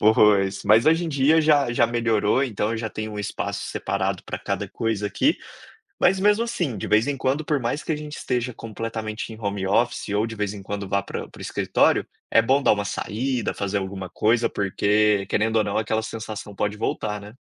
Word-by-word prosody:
Pois. 105 Hz, -2 st, +4 dB
Mas 110 Hz, +5 st, +5 dB
hoje 165 Hz, +2 st, +4 dB
em -, -, -2 dB
dia 150 Hz, +2 st, +4 dB
já 145 Hz, -5 st, +3 dB
já 120 Hz, -, +4 dB
melhorou, 115 Hz, +1 st, +1 dB
então 105 Hz, -4 st, -2 dB
eu 115 Hz, -, -1 dB
já 110 Hz, 0 st, -3 dB
tenho 110 Hz, 0 st, -5 dB
um 105 Hz, -, -6 dB
espaço 100 Hz, 0 st, -3 dB
separado 95 Hz, -1 st, -2 dB
para -, -, -5 dB
cada -, -, -3 dB
coisa 110 Hz, -3 st, -2 dB
aqui, 290 Hz, -, +2 dB, 0.7 s
mas 195 Hz, -, +4 dB
mesmo, 210 Hz, +3 st, +3 dB
assim, 175 Hz, -, -2 dB
de -, -, -4 dB
vez 110 Hz, +4 st, +3 dB
em 145 Hz, -1 st, -1 dB
quando 135 Hz, +4 st, 0 dB
por 150 Hz, -3 st, +1 dB
mais 125 Hz, +4 st, -2 dB
que -, -, -2 dB
a 155 Hz, -, +1 dB
gente 150 Hz, 0 st, -7 dB
esteja 125 Hz, -1 st, -2 dB
completamente 110 Hz, 0 st, -5 dB
em 110 Hz, -, -12 dB
home 100 Hz, -2 st, -2 dB
office 120 Hz, +5 st, +1 dB
ou 105 Hz, +2 st, +1 dB
de 115 Hz, -, -7 dB
vez 105 Hz, -1 st, -2 dB
em 100 Hz, -, -8 dB
quando 100 Hz, 0 st, -4 dB
vá 100 Hz, 0 st, +1 dB
para -, -, -6 dB
para -, -, -16 dB
o -, -, -9 dB
escritório, -, -, +2 dB, 0.2 s
é 115 Hz, -, +5 dB
bom 135 Hz, +5 st, +2 dB
dar -, -, +5 dB
uma 105 Hz, -1 st, -2 dB
saída, 120 Hz, +4 st, -2 dB
fazer 100 Hz, 0 st, -2 dB
alguma 95 Hz, -1 st, -5 dB
coisa 115 Hz, +5 st, +2 dB
porque 105 Hz, +1 st, +2 dB
querendo 110 Hz, +1 st, 0 dB
ou 110 Hz, -, +4 dB
não 100 Hz, -, -2 dB
aquela 110 Hz, 0 st, 0 dB
sensação 110 Hz, -2 st, -6 dB
pode 105 Hz, +2 st, -1 dB
voltar, 105 Hz, -1 st, -2 dB
né. 105 Hz, +1 st, -11 dB
110 Hz, 215 wpm, -24 LUFS, 105-125 Hz, 0.7 s, Mas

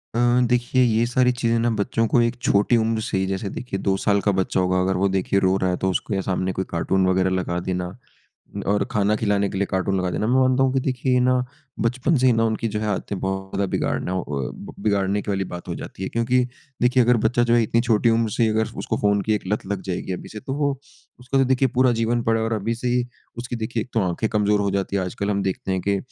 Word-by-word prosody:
अ, -, -, 0 dB, 0.3 s
देखिए 125 Hz, +1 st, +2 dB
ये 115 Hz, -1 st, +2 dB
सारी 125 Hz, +1 st, +2 dB
चीज़ें 115 Hz, -1 st, +2 dB
ना 120 Hz, +1 st, +1 dB
बच्चों 115 Hz, +2 st, +1 dB
को 120 Hz, -, +6 dB
एक 115 Hz, 0 st, +1 dB
छोटी 105 Hz, +1 st, +3 dB
उम्र 110 Hz, 0 st, 0 dB
से -, -, 0 dB
ही, 95 Hz, -, +1 dB
जैसे 100 Hz, +1 st, -4 dB
देखिए, 120 Hz, -6 st, -5 dB
2 95 Hz, 0 st, 0 dB
साल 100 Hz, -1 st, +3 dB
का 100 Hz, -, +2 dB
बच्चा 95 Hz, -, 0 dB
होगा 90 Hz, 0 st, +2 dB
अगर 95 Hz, +1 st, +1 dB
वो 100 Hz, -, +3 dB
देखिए 100 Hz, +1 st, +1 dB
रो 95 Hz, 0 st, +2 dB
रहा 95 Hz, -1 st, 0 dB
है 90 Hz, -, -1 dB
तो 95 Hz, -, +3 dB
उसको 95 Hz, +3 st, -2 dB
ये 95 Hz, -, 0 dB
सामने 95 Hz, +1 st, 0 dB
कोई 95 Hz, -, -2 dB
कार्टून 95 Hz, +3 st, +1 dB
वगैरह 95 Hz, 0 st, +2 dB
लगा 90 Hz, -1 st, -2 dB
देना। 90 Hz, +1 st, -3 dB, 0.7 s
और 105 Hz, +1 st, +2 dB
खाना 105 Hz, 0 st, +2 dB
खिलाने 100 Hz, -2 st, +1 dB
के 95 Hz, -, -4 dB
लिए 100 Hz, -, +1 dB
कार्टून 95 Hz, +1 st, 0 dB
लगा 90 Hz, -1 st, -1 dB
देना 105 Hz, -, -1 dB
मैं 120 Hz, -, +2 dB
मानता 130 Hz, 0 st, +3 dB
हूँ 130 Hz, -1 st, +2 dB
कि 135 Hz, -, +1 dB
देखिए 130 Hz, -1 st, 0 dB
ना 125 Hz, +1 st, +3 dB, 0.5 s
बचपन 130 Hz, +7 st, +1 dB
से 130 Hz, -, +3 dB
ही 125 Hz, -, +6 dB
ना 115 Hz, 0 st, +2 dB
उनकी 115 Hz, 0 st, -1 dB
जो 105 Hz, 0 st, -3 dB
है 110 Hz, -, -2 dB
आदतें 100 Hz, 0 st, -3 dB
बहुत 95 Hz, 0 st, -3 dB
ज़्यादा 100 Hz, -, 0 dB
बिगाड़ना 90 Hz, -, -1 dB
अ, 95 Hz, -, -2 dB, 0.6 s
बिगाड़ने 100 Hz, -1 st, +1 dB
के 105 Hz, -, -4 dB
वाली 95 Hz, -1 st, 0 dB
बात 90 Hz, 0 st, -8 dB
हो -, -, -2 dB
जाती -, -, -8 dB
है। 95 Hz, -, -2 dB
क्योंकि 115 Hz, +2 st, +1 dB, 0.4 s
देखिए, 125 Hz, +1 st, +4 dB
अगर 120 Hz, +1 st, +4 dB
बच्चा 120 Hz, +1 st, +2 dB
जो 120 Hz, -, +5 dB
इतनी 115 Hz, 0 st, +2 dB
छोटी 115 Hz, -1 st, +2 dB
उम्र 115 Hz, -1 st, +1 dB
से 115 Hz, -, +3 dB
अगर 110 Hz, +1 st, +1 dB
उसको -, -, -2 dB
फ़ोन 100 Hz, 0 st, +3 dB
की 110 Hz, -, +2 dB
एक 105 Hz, -, -2 dB
लत 105 Hz, +1 st, -2 dB
लग 100 Hz, -1 st, -3 dB
जाएगी 90 Hz, +1 st, -3 dB
अभी 90 Hz, -, -6 dB
से 105 Hz, -, -8 dB
तो 135 Hz, -, -2 dB
वो, 145 Hz, -1 st, +2 dB, 0.5 s
उसका 130 Hz, +2 st, -1 dB
तो 135 Hz, -, +4 dB
देखिए 130 Hz, +1 st, +2 dB
पूरा 130 Hz, 0 st, +4 dB
जीवन 120 Hz, +1 st, +1 dB
पड़ा 115 Hz, 0 st, +1 dB
है -, -, 0 dB
और 115 Hz, -, -2 dB
अभी 110 Hz, +1 st, -1 dB
से 125 Hz, +2 st, -3 dB
ही, 125 Hz, 0 st, +1 dB, 0.3 s
उसकी 120 Hz, 0 st, -4 dB
देखिए 115 Hz, 0 st, -2 dB
एक 125 Hz, -, -14 dB
तो 115 Hz, -, +3 dB
आँखें 90 Hz, +6 st, -1 dB
कमज़ोर 105 Hz, -1 st, +2 dB
हो 100 Hz, -1 st, 0 dB
जाती 100 Hz, 0 st, -1 dB
हैं। 95 Hz, -, +1 dB
आजकल 100 Hz, +3 st, -3 dB
हम 100 Hz, -1 st, 0 dB
देखते 95 Hz, 0 st, -2 dB
हैं 95 Hz, -, 0 dB
कि 100 Hz, 0 st, +2 dB
105 Hz, 260 wpm, -23 LUFS, 95-120 Hz, 0.7 s, को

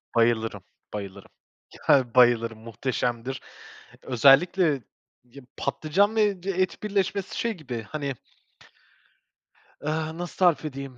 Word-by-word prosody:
Bayılırım, 115 Hz, -4 st, +1 dB, 0.3 s
bayılırım. 100 Hz, -2 st, -7 dB, 0.6 s
Yani 125 Hz, -4 st, +4 dB
bayılırım, 115 Hz, -2 st, +4 dB
muhteşemdir. 120 Hz, +2 st, -3 dB, 0.6 s
Özellikle 140 Hz, -, +4 dB, 0.4 s
ya 125 Hz, +3 st, -14 dB, 0.2 s
patlıcan 200 Hz, +8 st, +1 dB
ve 205 Hz, -4 st, +1 dB
d 195 Hz, -, -3 dB
et 185 Hz, +3 st, -1 dB
birleşmesi 200 Hz, -1 st, -1 dB
şey 230 Hz, -1 st, 0 dB
gibi, 125 Hz, -, -6 dB
hani 140 Hz, -3 st, -3 dB, 1.7 s
ııı, 160 Hz, +1 st, -2 dB
nasıl 175 Hz, 0 st, -6 dB
tarif 170 Hz, -5 st, +3 dB
edeyim? 135 Hz, -3 st, -7 dB
140 Hz, 105 wpm, -26 LUFS, 120-175 Hz, 1.7 s, Yani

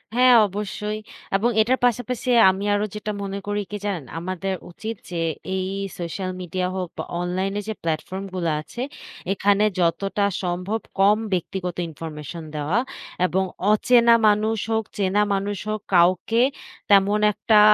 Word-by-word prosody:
হ্যাঁ, 250 Hz, 0 st, +7 dB
অবশ্যই। 210 Hz, +2 st, -4 dB, 0.4 s
এবং 215 Hz, +5 st, +3 dB
এটার 250 Hz, +4 st, +2 dB
পাশাপাশি 245 Hz, +1 st, -1 dB, 0.2 s
আমি 190 Hz, +2 st, -1 dB
আরো 205 Hz, +1 st, +1 dB
যেটা 210 Hz, 0 st, -3 dB
মনে 195 Hz, 0 st, -4 dB
করি 205 Hz, 0 st, 0 dB
কি, 210 Hz, -, -3 dB
জানেন? 185 Hz, -8 st, -2 dB
আমাদের 185 Hz, +2 st, -3 dB, 0.2 s
উচিত 220 Hz, +6 st, -5 dB
যে, 175 Hz, -2 st, -3 dB, 0.3 s
এই 185 Hz, 0 st, -1 dB, 0.3 s
সোশ্যাল 185 Hz, +2 st, -3 dB
মিডিয়া 180 Hz, +1 st, -2 dB
হোক 185 Hz, -1 st, -2 dB
বা -, -, -2 dB, 0.2 s
অনলাইন 185 Hz, +2 st, -1 dB
এ -, -, -3 dB
যে 220 Hz, -, -1 dB
প্লাটফর্ম 175 Hz, +4 st, -3 dB
গুলা 170 Hz, -3 st, 0 dB
আছে, 235 Hz, -, -8 dB, 0.5 s
এখানে 200 Hz, +1 st, +3 dB, 0.2 s
যতটা 195 Hz, +4 st, +1 dB, 0.2 s
সম্ভব 180 Hz, +5 st, -1 dB, 0.2 s
কম 200 Hz, +2 st, +6 dB, 0.2 s
ব্যক্তিগত 180 Hz, 0 st, -2 dB
ইনফরমেশন 160 Hz, +1 st, -7 dB
দেওয়া 150 Hz, +9 st, +1 dB, 0.5 s
এবং 190 Hz, +1 st, +1 dB, 0.3 s
অচেনা 235 Hz, +2 st, +5 dB
মানুষ 215 Hz, +2 st, +2 dB
হোক, 220 Hz, 0 st, +1 dB
চেনা 200 Hz, +1 st, +2 dB
মানুষ 200 Hz, +1 st, -1 dB
হোক, 215 Hz, -, -1 dB, 0.2 s
কাউকে 185 Hz, +6 st, +4 dB, 0.5 s
তেমন 200 Hz, +1 st, +5 dB
একটা 215 Hz, +1 st, +3 dB
195 Hz, 145 wpm, -23 LUFS, 180-210 Hz, 0.5 s, হ্যাঁ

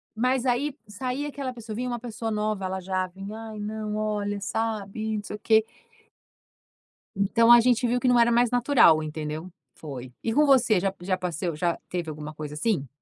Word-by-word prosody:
mas 255 Hz, +2 st, +1 dB
aí 265 Hz, +4 st, 0 dB
saía 255 Hz, +7 st, -3 dB
aquela 275 Hz, -2 st, -4 dB
pessoa, 230 Hz, -3 st, -8 dB
vinha 250 Hz, +3 st, -2 dB
uma 240 Hz, -1 st, -3 dB
pessoa 225 Hz, -1 st, -5 dB
nova, 210 Hz, -2 st, -1 dB
ela 190 Hz, 0 st, -2 dB
já 185 Hz, 0 st, -2 dB
vinha: 205 Hz, +5 st, -8 dB
"Aí, 215 Hz, -1 st, -8 dB
não, 210 Hz, 0 st, -4 dB
olha, 210 Hz, -1 st, -1 dB
sabe, 220 Hz, +1 st, -2 dB
não 205 Hz, -, -5 dB
sei 210 Hz, -, -6 dB
o -, -, -9 dB
quê". 220 Hz, 0 st, +4 dB, 1.5 s
Então 230 Hz, +4 st, +4 dB
a 240 Hz, -, +10 dB
gente 245 Hz, +1 st, +3 dB
viu 245 Hz, +1 st, +1 dB
que 255 Hz, -, 0 dB
não 245 Hz, -1 st, +5 dB
era 235 Hz, 0 st, +5 dB
mais 240 Hz, 0 st, +4 dB
natural, 245 Hz, -, +5 dB
entendeu. 155 Hz, +3 st, -5 dB, 0.3 s
Foi. 130 Hz, -5 st, -8 dB
E 225 Hz, -, 0 dB
com 300 Hz, +3 st, +4 dB
você 250 Hz, -7 st, +4 dB
já 195 Hz, +1 st, -1 dB
já 185 Hz, +1 st, 0 dB
passou 175 Hz, -2 st, -3 dB
já 170 Hz, +2 st, 0 dB
teve 175 Hz, -3 st, -3 dB
alguma 150 Hz, 0 st, -7 dB
coisa 150 Hz, -1 st, -7 dB
assim? 150 Hz, -, 0 dB
215 Hz, 195 wpm, -26 LUFS, 185-240 Hz, 1.5 s, a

